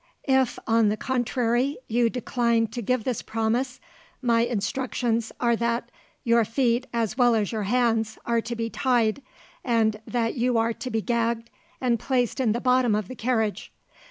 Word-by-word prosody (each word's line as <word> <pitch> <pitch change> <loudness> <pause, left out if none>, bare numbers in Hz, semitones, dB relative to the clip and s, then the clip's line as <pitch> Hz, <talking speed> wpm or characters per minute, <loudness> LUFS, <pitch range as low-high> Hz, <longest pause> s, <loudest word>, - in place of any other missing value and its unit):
If, 265 -2 +2
on 225 -2 +3
the 210 - -1
contrary, 245 +1 0
you 235 +1 +2
decline 235 -1 +1
to 240 +2 -5
give 250 +1 0
this 250 -2 -2
promise, 230 +3 -1 0.4
my 235 -3 +2
instructions 235 0 -1
are 235 -1 +2
that 235 +1 -1 0.3
your 235 -1 +4
feet 240 +2 0
as 230 +1 -2
well 245 -2 +5
as 210 -3 0
your 215 -3 -2
hands 225 -2 +1
are 235 -1 +1
to 235 +1 -5
be 230 0 -2
tied, 240 0 +1 0.4
and 220 -3 +1
that 230 -2 0
you 245 -1 +1
are 225 +1 +1
to 255 - -6
be 225 -3 -1
gagged 235 -1 -1 0.3
and 240 -3 +1
placed 250 0 0
in 245 -5 +2
the 235 - 0
bottom 250 -3 +3
of 210 -3 -2
the 255 - -6
carriage. 220 -3 -1
235 Hz, 170 wpm, -25 LUFS, 225-250 Hz, 0.4 s, well